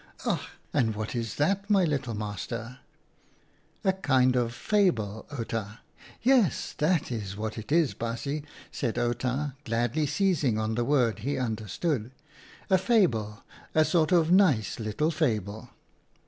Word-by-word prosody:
"Ach! -, -, +1 dB, 0.3 s
and 110 Hz, -3 st, +2 dB
what 110 Hz, +3 st, -4 dB
is 115 Hz, -2 st, -3 dB
that, 195 Hz, +7 st, 0 dB
my 195 Hz, -3 st, +4 dB
little 135 Hz, -7 st, -1 dB
master 110 Hz, +4 st, -5 dB, 0.3 s
?" -, -, -36 dB
" -, -, -37 dB
A 190 Hz, -, +3 dB
kind 130 Hz, -8 st, +2 dB
of 120 Hz, -2 st, +1 dB
fable, 115 Hz, -, 0 dB
Outa." 115 Hz, -4 st, -4 dB, 0.2 s
" -, -, -19 dB, 0.2 s
Yes, 245 Hz, -, +3 dB
that's 120 Hz, -, -1 dB
what 110 Hz, 0 st, -3 dB
it 110 Hz, +4 st, -8 dB
is, 160 Hz, -2 st, +3 dB
baasje," 130 Hz, +6 st, -3 dB, 0.3 s
said 120 Hz, -4 st, -2 dB
Outa, 125 Hz, +4 st, -1 dB
gladly 120 Hz, +5 st, 0 dB
seizing 150 Hz, -, +1 dB
on 110 Hz, 0 st, -1 dB
the 120 Hz, +2 st, 0 dB
word 125 Hz, -5 st, +2 dB
he 135 Hz, +7 st, -2 dB
understood, 115 Hz, -, -2 dB, 0.3 s
" -, -, -22 dB
a 190 Hz, -, +6 dB
fable, 140 Hz, -, +1 dB, 0.3 s
a 155 Hz, 0 st, +5 dB
sort 165 Hz, 0 st, +2 dB
of 170 Hz, -2 st, +4 dB
nice 155 Hz, -, +3 dB
little 115 Hz, +9 st, 0 dB
fable." 110 Hz, -, -1 dB
125 Hz, 145 wpm, -28 LUFS, 110-160 Hz, 0.3 s, a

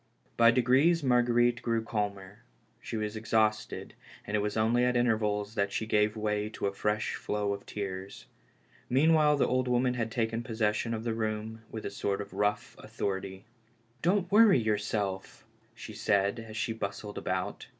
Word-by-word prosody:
By 115 Hz, 0 st, +6 dB
degrees 130 Hz, +7 st, +3 dB
Marguerite 120 Hz, -1 st, +3 dB
grew 115 Hz, -1 st, 0 dB
calmer; 100 Hz, -2 st, -4 dB, 0.4 s
she 115 Hz, -, -5 dB
was 105 Hz, 0 st, -3 dB
ex 110 Hz, +1 st, -7 dB
hausted, 110 Hz, -1 st, +1 dB, 0.3 s
and 105 Hz, -, -2 dB
it -, -, +2 dB
was 105 Hz, +1 st, -2 dB
only 115 Hz, +3 st, +3 dB
at 125 Hz, 0 st, +2 dB
intervals 110 Hz, -3 st, 0 dB
that 100 Hz, -3 st, 0 dB
she 110 Hz, -, -2 dB
gave 105 Hz, 0 st, +1 dB
way 105 Hz, 0 st, -1 dB
to 110 Hz, -, -5 dB
a 100 Hz, -, 0 dB
fresh 105 Hz, +2 st, -1 dB
flow 105 Hz, -1 st, -2 dB
of 100 Hz, -, -8 dB
tears. 95 Hz, -1 st, -6 dB, 0.6 s
Meanwhile 150 Hz, +2 st, +4 dB
the -, -, +2 dB
old 130 Hz, 0 st, 0 dB
woman 125 Hz, 0 st, +2 dB
had 115 Hz, -2 st, -2 dB
taken 115 Hz, 0 st, -1 dB
possession 110 Hz, 0 st, -1 dB
of 110 Hz, -, -5 dB
the 115 Hz, -1 st, -1 dB
room 110 Hz, 0 st, -3 dB
with 110 Hz, -, -7 dB
a -, -, -3 dB
sort 100 Hz, 0 st, -2 dB
of 100 Hz, 0 st, -7 dB
rough 105 Hz, +2 st, -1 dB
authority. 95 Hz, 0 st, -4 dB, 0.3 s
" 115 Hz, +1 st, -37 dB
Don't 185 Hz, +3 st, +1 dB
worry 210 Hz, -, +6 dB
jT^ourself," 105 Hz, -2 st, -2 dB, 0.3 s
she 110 Hz, -, -9 dB
said, 100 Hz, 0 st, +1 dB
as 110 Hz, -1 st, -8 dB
she 115 Hz, +1 st, -1 dB
bustled 105 Hz, -1 st, -5 dB
about. 95 Hz, 0 st, -3 dB
110 Hz, 170 wpm, -30 LUFS, 105-120 Hz, 0.6 s, By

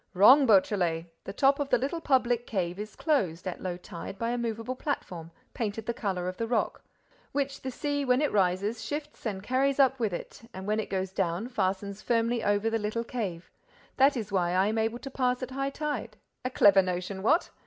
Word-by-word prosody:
"Wrong, 260 Hz, +9 st, +8 dB
Beautrelet! 185 Hz, -5 st, +3 dB, 0.2 s
The -, -, -4 dB
top 275 Hz, +4 st, +3 dB
of 285 Hz, -1 st, -1 dB
the 250 Hz, -, +4 dB
little 280 Hz, +7 st, -2 dB
public 245 Hz, -4 st, +2 dB
cave 180 Hz, -3 st, -2 dB
is 210 Hz, 0 st, -6 dB
closed, 195 Hz, -, 0 dB
at 180 Hz, -, -5 dB
low 180 Hz, -2 st, -3 dB
tide, 180 Hz, +1 st, -8 dB
by 230 Hz, +2 st, -1 dB
a 245 Hz, -, -1 dB
movable 230 Hz, +1 st, -3 dB
platform, 180 Hz, -, -4 dB, 0.2 s
painted 220 Hz, -1 st, -3 dB
the 235 Hz, -, -1 dB
color 190 Hz, -6 st, -2 dB
of 185 Hz, -, -4 dB
the 230 Hz, -, -2 dB
rock, 230 Hz, -1 st, 0 dB, 0.5 s
which 275 Hz, -1 st, -2 dB
the 260 Hz, -, -4 dB
sea, 285 Hz, +2 st, -2 dB
when 250 Hz, -1 st, +3 dB
it 300 Hz, -, +1 dB
rises, 200 Hz, +3 st, +1 dB
shifts 295 Hz, -4 st, -5 dB
and 195 Hz, -3 st, -4 dB
carries 270 Hz, +4 st, +1 dB
up 265 Hz, -1 st, +4 dB
with 220 Hz, -4 st, 0 dB
it 175 Hz, -, -7 dB
and, 190 Hz, 0 st, -6 dB
when 215 Hz, +1 st, 0 dB
it 215 Hz, -, -3 dB
goes 190 Hz, -1 st, -2 dB
down, 190 Hz, +4 st, -1 dB
fastens 200 Hz, -2 st, -2 dB
firmly 230 Hz, 0 st, +1 dB
over 205 Hz, +1 st, +1 dB
the 225 Hz, 0 st, +1 dB
little 215 Hz, +2 st, -2 dB
cave. 200 Hz, -8 st, -5 dB, 0.5 s
That 275 Hz, +1 st, +5 dB
is 210 Hz, -3 st, -4 dB
why 180 Hz, -3 st, +1 dB
I 185 Hz, +1 st, +3 dB
am 220 Hz, +2 st, 0 dB
able 225 Hz, +2 st, 0 dB
to 270 Hz, +2 st, -8 dB
pass 250 Hz, -1 st, 0 dB
at 255 Hz, -, -5 dB
high 275 Hz, +1 st, -1 dB
tide. 275 Hz, -7 st, -4 dB, 0.3 s
A 255 Hz, -, -1 dB
clever 200 Hz, -5 st, +6 dB
notion, 185 Hz, +1 st, -3 dB
what? 315 Hz, -, +2 dB
225 Hz, 210 wpm, -28 LUFS, 190-255 Hz, 0.5 s, Wrong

